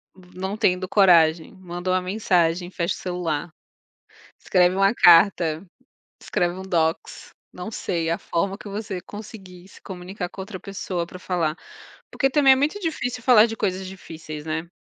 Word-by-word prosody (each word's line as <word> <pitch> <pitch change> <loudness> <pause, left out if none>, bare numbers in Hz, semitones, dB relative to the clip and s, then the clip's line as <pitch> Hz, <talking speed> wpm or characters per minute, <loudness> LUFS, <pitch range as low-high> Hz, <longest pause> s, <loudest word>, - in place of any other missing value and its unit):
v 185 -1 -18
não 190 +2 -3
tendo 185 -2 +1
coragem, 170 -5 +4
manda 175 -1 -6
uma 185 0 +2
mensagem, 180 -3 0
fecha 170 -1 -1
o - - -11
celular. 175 -3 -3 0.9
Escreve 180 0 +2
uma 195 +3 +3
carta, 170 -3 +5 0.6
escreve 175 0 -1
um 190 - -7
docs. 165 -4 -2 0.2
Não 180 +3 -7
sei. 170 -5 -2
A 170 - 0
forma 195 +3 -2
que 210 - -11
você 200 -2 -5
conseguir 190 -4 -11
se - - -17
comunicar 180 0 -6
com 190 - -9
a - - -4
outra 190 -1 -8
pessoa 185 -3 -4
pra 180 - -11
falar. 170 -4 -1 0.6
Porque 270 - +1
também 270 -1 +5
é - - +2
muito 295 +9 0
difícil 300 - -3
falar 230 -4 +7
de 225 - -5
coisas 190 -2 -2
difíceis, 160 -5 -9
né. 160 +2 -4
185 Hz, 165 wpm, -23 LUFS, 170-200 Hz, 0.9 s, falar